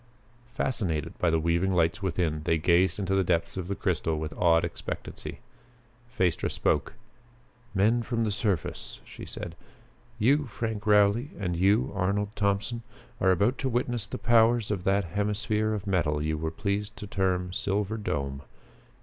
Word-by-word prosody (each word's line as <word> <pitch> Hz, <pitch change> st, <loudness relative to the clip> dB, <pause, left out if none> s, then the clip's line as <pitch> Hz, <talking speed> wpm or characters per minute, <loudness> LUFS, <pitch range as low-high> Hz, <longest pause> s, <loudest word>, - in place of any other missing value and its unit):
Fascinated 90 Hz, -, -1 dB
by 90 Hz, -, +3 dB
the 80 Hz, 0 st, +2 dB
weaving 85 Hz, +4 st, +1 dB
lights 85 Hz, +2 st, +2 dB
within, 85 Hz, -5 st, -1 dB
they 80 Hz, +1 st, +1 dB
gazed 85 Hz, +4 st, +3 dB
into 95 Hz, -2 st, -1 dB
the 95 Hz, 0 st, +3 dB
depths 85 Hz, -1 st, 0 dB
of 95 Hz, -2 st, -4 dB
the 100 Hz, -, -2 dB
crystal 85 Hz, -5 st, 0 dB
with 80 Hz, 0 st, -4 dB
awed 85 Hz, -1 st, +4 dB
expectancy. 85 Hz, -, -6 dB, 0.8 s
Phaestra 90 Hz, -3 st, +1 dB
spoke. -, -, 0 dB, 0.8 s
"Men 110 Hz, +5 st, +3 dB
from 115 Hz, 0 st, -1 dB
the 110 Hz, -, 0 dB
surface," 100 Hz, -, -2 dB
she -, -, -10 dB
said, 85 Hz, -, -6 dB, 0.6 s
"you, 140 Hz, +6 st, +3 dB
Frank 110 Hz, -2 st, -4 dB
Rowley, 105 Hz, +5 st, +4 dB
and 90 Hz, -4 st, -1 dB
you, 105 Hz, +9 st, +3 dB
Arnold 100 Hz, +1 st, 0 dB
Thompson, 100 Hz, +3 st, 0 dB, 0.4 s
are 95 Hz, -, +3 dB
about 100 Hz, +8 st, +2 dB
to 135 Hz, -, 0 dB
witness 120 Hz, -3 st, -1 dB
the -, -, -5 dB
powers 115 Hz, -1 st, +3 dB
of 95 Hz, -2 st, -2 dB
that 100 Hz, +1 st, +3 dB
hemisphere 105 Hz, +4 st, 0 dB
of 105 Hz, -1 st, -3 dB
metal 85 Hz, -7 st, +1 dB
you 80 Hz, +1 st, -1 dB
were 80 Hz, +1 st, -2 dB
pleased 100 Hz, +4 st, -3 dB
to -, -, -6 dB
term 90 Hz, -2 st, -1 dB
'Silver 100 Hz, +3 st, -1 dB
Dome.' 70 Hz, -9 st, -3 dB
100 Hz, 160 wpm, -28 LUFS, 85-105 Hz, 0.8 s, awed